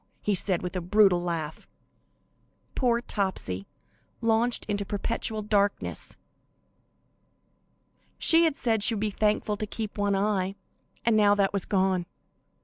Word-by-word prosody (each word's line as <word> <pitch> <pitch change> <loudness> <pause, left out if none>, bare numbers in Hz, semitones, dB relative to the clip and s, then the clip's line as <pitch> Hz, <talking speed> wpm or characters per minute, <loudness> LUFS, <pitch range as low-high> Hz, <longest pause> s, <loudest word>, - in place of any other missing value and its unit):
he 210 - +1
said, 185 -1 0
with 180 +1 -5
a 185 - -1
brutal 190 0 +4
laugh. 165 -3 -4 1.1
Poor 240 -2 +1
Topsy, 190 - -3 0.5
launched 230 +1 +1
into 205 -1 -2
perpetual 215 +2 -2
darkness! 205 -1 -1 2.0
She 335 0 +6
had 315 -4 +1
said 225 -5 0
she 225 +2 +4
would - - -3
be 215 0 -1
thankful 210 0 0
to 215 - -4
keep 215 0 -6
one 200 -1 +1
eye, 195 -1 0 0.5
and 230 -1 +3
now 205 -1 +5
that 200 -1 +1
was 200 -3 -1
gone. 185 -3 0
205 Hz, 135 wpm, -27 LUFS, 190-220 Hz, 2.0 s, She